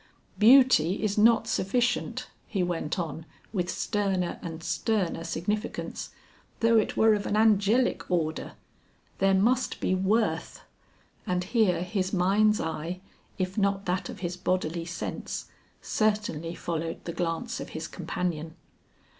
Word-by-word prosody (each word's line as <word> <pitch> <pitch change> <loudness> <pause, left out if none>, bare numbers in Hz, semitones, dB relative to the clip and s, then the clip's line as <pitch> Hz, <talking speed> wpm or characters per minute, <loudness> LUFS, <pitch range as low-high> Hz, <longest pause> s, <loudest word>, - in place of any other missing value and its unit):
Beauty 225 - +6
is 205 -2 +1
not 225 +1 +5
sufficient," 240 +6 0 0.2
he 195 -4 -1
went 170 -2 -2
on 165 -2 -4 0.3
with 180 -4 -1
sterner 195 -3 -1
and 165 -1 -7
sterner 180 -1 -1
significance, 205 +7 -3 0.5
"though 230 0 +4
it 215 - -2
were 220 0 +6
of 205 -1 -1
an 210 - 0
angelic 220 +3 +3
order. 160 -3 -1 0.7
There 195 0 +4
must 240 +7 +2
be - - 0
worth." 205 +4 0 0.7
And 180 0 0
here 195 -4 +2
his 185 0 -2
mind's 205 +3 +3
eye 165 +2 -3 0.4
if 185 +2 -2
not 200 0 +1
that 180 0 -1
of - - -8
his 180 -1 -3
bodily 175 -2 -1
sense, 180 +1 -5 0.3
certainly 205 -7 0
followed 165 -2 -4
the 170 - -4
glance 175 +8 -2
of - - -6
his 160 +1 -5
companion. 165 -2 -4
185 Hz, 130 wpm, -28 LUFS, 170-215 Hz, 0.7 s, Beauty